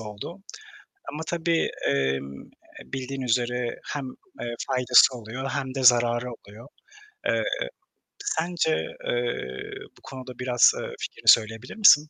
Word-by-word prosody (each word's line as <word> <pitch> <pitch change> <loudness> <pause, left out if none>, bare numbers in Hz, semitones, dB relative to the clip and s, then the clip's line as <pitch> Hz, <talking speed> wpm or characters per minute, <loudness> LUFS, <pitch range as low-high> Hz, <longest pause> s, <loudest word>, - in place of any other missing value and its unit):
oldu 110 - -8 0.7
ama 155 +2 -4
tabii, 170 -1 +1 0.2
emm, 70 0 -1 0.4
bildiğin 135 0 -5
üzere 120 0 0
hem, 145 -2 -3 0.4
eee, 120 0 -3
faydası 125 0 +5
oluyor 125 +4 -5
hem 135 -1 -3
de 135 - -2
zararı 120 0 +5
oluyor. 110 +2 -14 0.6
Eee, - - +2 0.8
sence, 170 - 0 0.3
eee, 120 0 -1 0.5
bu - - -21
konuda 130 -2 -9
biraz, 125 -1 +5
eee, - - -6
fikrini - - -7
söyleyebilir 115 +2 +4
misin? 155 -8 +7
125 Hz, 120 wpm, -26 LUFS, 115-135 Hz, 0.8 s, misin